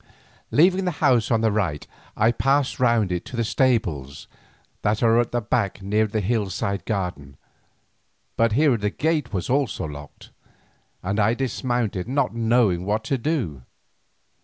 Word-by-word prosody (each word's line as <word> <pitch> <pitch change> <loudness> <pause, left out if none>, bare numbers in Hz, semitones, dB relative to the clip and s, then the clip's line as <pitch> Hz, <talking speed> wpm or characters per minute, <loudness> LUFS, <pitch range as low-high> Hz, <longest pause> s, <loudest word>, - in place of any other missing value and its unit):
Leaving 185 +5 +3
the 180 - 0
house 125 -7 +3
on 115 -2 +2
the 110 -1 +2
right 90 -9 -1 0.3
I 110 +2 +4
passed 135 +3 +1
round 115 -6 +2
it 90 -1 -2
to - - -8
the 115 - 0
stables 95 - 0 0.6
that 105 +2 0
are 115 0 +4
at 120 - 0
the 120 - 0
back 105 -3 -1
near 105 +2 +1
the 105 +1 -2
hillside 100 -2 -2
garden, 90 -10 -4 1.0
but 115 -1 +2
here 140 -1 +3
the 105 -1 -1
gate 155 +2 -1
was 95 -4 -3
locked 135 +3 +3 0.2
also, 75 -1 -6 0.9
and 100 +3 -1
I 110 +3 +3
dismounted 120 -6 -2
not 140 0 0
knowing 115 -6 +2
what 105 +3 -1
to 135 - -1
do. 120 - -2
110 Hz, 155 wpm, -23 LUFS, 100-125 Hz, 1.0 s, I